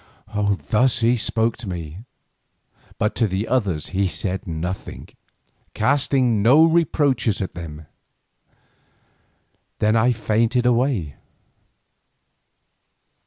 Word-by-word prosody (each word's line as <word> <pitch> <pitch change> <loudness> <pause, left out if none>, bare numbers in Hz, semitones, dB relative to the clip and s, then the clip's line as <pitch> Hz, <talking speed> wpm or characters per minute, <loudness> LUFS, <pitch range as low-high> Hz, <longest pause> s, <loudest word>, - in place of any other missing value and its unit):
Thus 125 +2 +3
he 115 +2 +3
spoke 115 0 0
to 115 -4 -7
me; 85 -1 -6 1.0
but 105 - 0
to 115 - +2
the 95 +3 -3
others 100 - -1
he 95 0 0
said 95 +1 -4
nothing, 90 +3 -5 0.7
casting 130 -2 +2
no 135 +9 +6
reproaches 145 - +1
at 95 - -4
them. 80 -3 -9 1.9
Then 110 +1 +2
I 115 +2 +3
fainted 115 +2 0
away. 120 - 0
110 Hz, 95 wpm, -21 LUFS, 95-125 Hz, 1.9 s, no